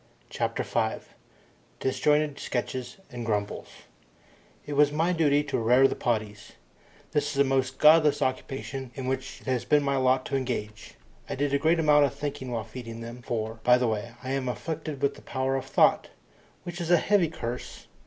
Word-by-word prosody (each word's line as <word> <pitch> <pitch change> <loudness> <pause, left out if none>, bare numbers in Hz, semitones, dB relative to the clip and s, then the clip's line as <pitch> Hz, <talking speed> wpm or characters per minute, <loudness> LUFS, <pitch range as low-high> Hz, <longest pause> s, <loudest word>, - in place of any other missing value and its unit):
CHAPTER - - -1
FIVE - - -2 0.7
Disjointed 150 +2 +1
Sketches 125 0 -4
And 120 -1 -6
Grumbles 105 -2 -2 1.0
It 145 - -5
was 145 0 +4
my 165 +4 +1
duty 145 -3 +3
to 145 - -2
"rare 125 +4 +5
the - - -2
poddies". 105 -3 -3 0.6
This 145 -1 +1
is - - -4
the 140 - +5
most 135 -1 0
godless 155 -1 +6
occupation 130 0 -3
in 130 - -5
which 130 0 -3
it - - -18
has 130 -2 0
been 150 -1 +3
my 140 -1 +1
lot 130 0 +2
to - - -2
engage. 120 -5 -4 0.3
I - - -2
did 140 +1 -1
a 140 - +3
great 160 +3 +3
amount 150 -2 +5
of 135 - -3
thinking 145 -3 -5
while 115 -2 -2
feeding 115 0 -8
them 120 +2 -8
for, 110 -1 -4
by 125 0 +6
the 125 -1 +1
way, 110 -2 -3
I 130 - -4
am 135 -2 -1
afflicted 155 +1 -5
with 140 - +2
the - - -14
power 130 0 -2
of 135 - -3
thought, - - +3 0.5
which 175 +1 -6
is 170 - -3
a 175 - +6
heavy 195 0 +3
curse. 120 -5 -6
135 Hz, 185 wpm, -27 LUFS, 125-145 Hz, 1.0 s, godless